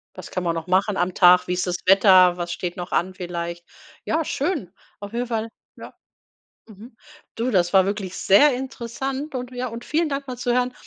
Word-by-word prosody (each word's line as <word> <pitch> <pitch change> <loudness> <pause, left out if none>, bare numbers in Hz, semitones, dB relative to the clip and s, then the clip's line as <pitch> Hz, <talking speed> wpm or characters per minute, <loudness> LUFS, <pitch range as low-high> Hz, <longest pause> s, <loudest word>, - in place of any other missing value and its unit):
Was - - -10
kann 185 - -3
man 170 -1 -1
noch 165 +1 -5
machen 190 +2 +1
am 180 +1 0
Tag? 180 0 +5
Wie 180 - -1
ist 180 +1 -2
das 180 0 -1
Wetter? 185 -2 +6
Was 175 0 -4
steht 175 0 -5
noch 175 0 -6
an 185 +2 0
vielleicht? 175 -1 -6 0.4
Ja, 320 0 0
schön. 290 - -3 0.3
Auf 205 +1 -9
jeden 245 +1 -2
Fall, 225 -1 -3 0.3
ja - - -11 0.7
mhm. 220 +2 -14 0.4
Du, 235 +3 -1
das 175 -6 +1
war 190 -1 +5
wirklich 195 -2 -4
sehr 270 +9 +5
interessant 265 +3 -5
und 250 0 -5
ja 250 0 -4
und 230 0 -8
vielen 320 +1 0
Dank 275 0 -4
mal 250 -1 -6
zu 245 0 -1
hören, 250 0 0
205 Hz, 205 wpm, -22 LUFS, 180-250 Hz, 0.7 s, Wetter